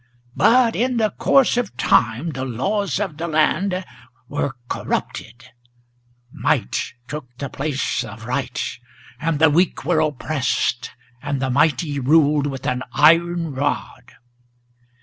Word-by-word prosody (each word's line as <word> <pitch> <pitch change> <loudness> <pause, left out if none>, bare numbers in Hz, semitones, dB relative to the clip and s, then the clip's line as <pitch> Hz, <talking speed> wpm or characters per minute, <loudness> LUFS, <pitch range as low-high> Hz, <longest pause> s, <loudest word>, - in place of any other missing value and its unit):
But 240 -1 +4
in 250 +1 0
the 215 -2 +1
course 270 -3 +3
of 215 - -2
time 120 +6 +2
the 130 -2 -5
laws 180 - -1
of 190 -8 -3
the 170 +2 -3
land 180 +4 +1 0.4
were 145 -1 -2
corrupted; 115 -1 -4 0.9
Might 60 - -1
took 150 -1 -6
the 140 0 -5
place 145 -1 -2
of 110 +2 -10
right, 125 +1 -3 0.6
and 160 0 0
the 160 0 +5
weak 175 -2 +1
were 165 0 +2
oppressed, 135 -5 -1 0.3
and 145 -1 -2
the 130 -1 -1
mighty 145 +1 +1
Ruled 145 +1 +3
with 135 -2 -6
an 125 -2 -1
iron 165 +1 +3
rod. 135 -2 -3
150 Hz, 130 wpm, -21 LUFS, 130-170 Hz, 0.9 s, the